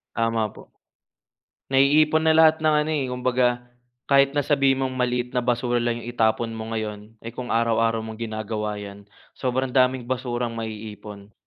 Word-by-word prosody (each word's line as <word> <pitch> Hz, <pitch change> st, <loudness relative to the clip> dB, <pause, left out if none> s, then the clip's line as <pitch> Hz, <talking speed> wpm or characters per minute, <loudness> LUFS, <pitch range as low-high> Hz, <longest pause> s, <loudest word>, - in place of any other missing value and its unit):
Tama 115 Hz, -1 st, +1 dB
po. -, -, -15 dB, 1.0 s
Naiipon 150 Hz, +4 st, +4 dB
na 160 Hz, 0 st, +3 dB
lahat 160 Hz, 0 st, +5 dB
ng 155 Hz, -1 st, +3 dB
ano 155 Hz, -, -2 dB
eh, 140 Hz, -4 st, -1 dB
kumbaga, 125 Hz, 0 st, +1 dB, 0.6 s
kahit 140 Hz, 0 st, +4 dB
na 145 Hz, -, +1 dB
sabihin 135 Hz, -2 st, +2 dB
mong 130 Hz, -, -3 dB
maliit 125 Hz, -1 st, -1 dB
na 125 Hz, -, +1 dB
basura 120 Hz, 0 st, 0 dB
lang 120 Hz, 0 st, -1 dB
'yong 120 Hz, -, -9 dB
itapon 115 Hz, 0 st, +1 dB
mo 110 Hz, 0 st, -6 dB
ngayon, 110 Hz, 0 st, -5 dB
eh, 115 Hz, -, -6 dB
kung 125 Hz, 0 st, -6 dB
araw-araw 115 Hz, 0 st, +2 dB
mong 110 Hz, 0 st, -8 dB
ginagawa 110 Hz, -1 st, -3 dB
yan, 100 Hz, 0 st, -9 dB, 0.3 s
sobrang 130 Hz, 0 st, -2 dB
daming 130 Hz, -1 st, +2 dB
basurang 120 Hz, -1 st, -2 dB
maiipon. 105 Hz, -2 st, -8 dB
120 Hz, 160 wpm, -24 LUFS, 110-130 Hz, 1.0 s, lahat